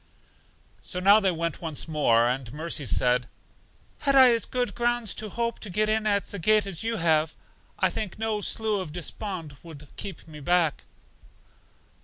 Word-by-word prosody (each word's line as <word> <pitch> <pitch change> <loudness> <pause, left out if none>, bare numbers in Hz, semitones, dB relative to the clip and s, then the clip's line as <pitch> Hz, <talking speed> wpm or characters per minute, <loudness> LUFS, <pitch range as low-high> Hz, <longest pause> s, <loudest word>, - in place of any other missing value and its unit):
So 180 - -1
now 200 +3 +6
they 195 -3 +2
went 170 -2 -2
on - - -24
once 160 -3 -2
more, 120 -7 +3
and 125 -1 -2
Mercy 155 -1 -1
said, 125 +1 +2 0.7
Had 280 -2 +1
I 260 -3 +8
as 230 - +1
good 250 -1 -2
grounds 240 -2 +1
to 215 -1 -4
hope 235 +3 -3
to 210 - -6
get 215 +4 0
in 215 0 +1
at 200 -1 0
the 200 - -6
gate 215 +4 +3
as 195 -2 -4
you 230 0 -1
have, 160 -2 +1 0.4
I - - +2
think 210 -5 -5
no 220 -1 -2
Slough 215 -1 0
Of 155 -5 -7
Despond 175 -3 -5
would 150 -4 -12
keep 190 -6 -6
me 155 -1 -11
back. 170 +1 +1
185 Hz, 180 wpm, -26 LUFS, 155-215 Hz, 0.7 s, I